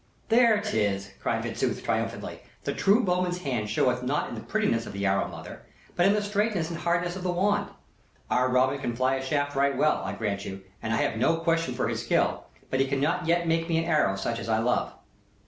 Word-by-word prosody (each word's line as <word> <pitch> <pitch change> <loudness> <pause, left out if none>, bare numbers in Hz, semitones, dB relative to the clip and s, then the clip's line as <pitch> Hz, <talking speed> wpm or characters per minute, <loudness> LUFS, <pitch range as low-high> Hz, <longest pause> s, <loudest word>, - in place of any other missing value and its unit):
"There 230 -2 +5
'tis!" 100 - -1
cried - - -1
Fitzooth, - - -2
triumphantly. - - -2 0.2
"The - - -2
true 210 +5 +3
bowman's 180 -1 0
hand 120 -6 -2
showeth 125 +3 +1
not 135 +4 -1
in - - -7
the - - -6
prettiness 160 - 0
of - - -8
an 100 0 -2
arrow, 95 0 +2
mother, - - -9 0.3
but 175 +1 +4
in 200 - +5
the 210 0 0
straightness 205 -5 0
and 165 - -5
hardness 175 +1 0
of 190 - -6
the 180 0 0
wand. 195 +4 +1 0.6
Our 125 +1 +2
Robin 130 +2 +2
can 120 -3 -3
fly 130 +2 +1
a 135 - -4
shaft 145 +1 -1
right 140 0 +2
well, 155 - +2
I 95 0 -3
grant 100 -2 -2
you, 95 0 -7 0.2
and 110 - -3
I 115 - +2
have 110 - 0
no 165 +7 +3
question 165 0 0
for - - 0
his - - -2
skill, - - +1 0.3
but 130 - +1
he 135 - +3
cannot 145 +5 0
yet 170 0 +2
make 165 +1 +1
me 165 - +2
an 165 - +1
arrow 150 - +2
such 115 +4 -2
as - - -6
I 110 - +3
love." 120 +2 +1
145 Hz, 225 wpm, -27 LUFS, 115-175 Hz, 0.6 s, There